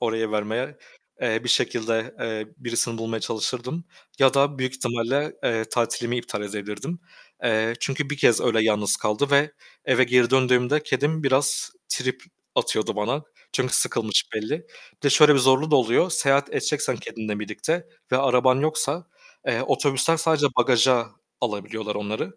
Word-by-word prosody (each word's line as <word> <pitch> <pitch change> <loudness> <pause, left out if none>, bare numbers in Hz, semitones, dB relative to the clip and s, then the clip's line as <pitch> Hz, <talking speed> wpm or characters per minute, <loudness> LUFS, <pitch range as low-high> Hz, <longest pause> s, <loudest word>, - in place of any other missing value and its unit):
oraya 115 -2 -1
vermeye. 110 +7 -2 0.4
Eee, 115 -2 0
bir - - -4
şekilde, 115 -1 0
eee, 110 -2 -4
birisini 120 -3 -1
bulmaya 115 0 -3
çalışırdım 125 +10 -3 0.3
ya 135 0 +5
da 140 0 +2
büyük 130 0 -2
ihtimalle, 130 +3 -1
eee, 110 -1 0
tatilimi 120 +1 -1
iptal 110 -3 -4
edebilirdim. 105 - -6 0.4
Eee, 115 -1 +1
çünkü 140 +1 -2
bir 150 - -2
kez 120 -5 +4
öyle 115 -2 +2
yalnız 105 -2 +2
kaldı 105 +7 -1
ve 145 +1 +3 0.3
eve 130 -1 +4
geri 125 0 +3
döndüğümde 130 +2 +3
kedim 150 +4 -1
biraz 135 +1 +1 0.2
trip 130 0 -2 0.3
atıyordu 110 -1 0
bana. 120 +8 -1 0.3
Çünkü 130 -1 0
sıkılmış 110 -3 +2
belli. 150 +10 -3 0.3
Bir - - -41
de 140 - +3
şöyle 150 +1 +7
bir - - +4
zorluğu 135 +4 +3
da 150 - +6
oluyor. 125 +9 +2
Seyahat 140 -3 +2
edeceksen 145 -4 -1
kendinle 110 -2 -6
birlikte 160 - -3 0.3
ve - - +5
araban 130 -1 +3
yoksa, 155 +2 -1 0.4
eee, - - 0
otobüsten 140 +3 +1
sadece 160 -2 +2
bagaja 125 -1 +4 0.3
alabiliyorlar 105 -1 -4
onları, 105 -2 -4
125 Hz, 150 wpm, -24 LUFS, 110-140 Hz, 0.4 s, şöyle